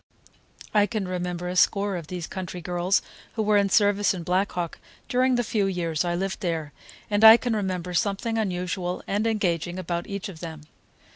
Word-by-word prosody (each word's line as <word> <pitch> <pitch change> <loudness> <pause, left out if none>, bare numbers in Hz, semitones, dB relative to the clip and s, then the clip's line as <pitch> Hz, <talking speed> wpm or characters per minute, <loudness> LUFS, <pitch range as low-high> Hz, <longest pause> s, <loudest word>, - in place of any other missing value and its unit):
I 210 -1 +4
can 215 -4 -3
remember 180 -1 -3
a 180 - -3
score 200 +1 +3
of 170 -4 -6
these 175 -1 -5
country 180 0 -6
girls 175 +2 0 0.3
who 220 - 0
were 210 0 +3
in 200 -1 +2
service 205 0 +3
in 175 - -6
Black 185 +4 +1
Hawk 175 -2 -4 0.3
during 255 0 +2
the 245 - +1
few 210 -3 0
years 170 -4 -1
I 175 -1 -1
lived 190 +2 -2
there, 165 -6 -3 0.4
and 205 +1 +2
I 220 +1 +11
can 240 -1 -1
remember 185 -3 -2
something 220 +4 0
unusual 180 -2 -2
and 205 +3 0
engaging 175 -5 -1
about 175 -1 -3
each 200 +1 -4
of 180 -5 -10
them. 160 -3 -7
185 Hz, 190 wpm, -25 LUFS, 175-205 Hz, 0.4 s, I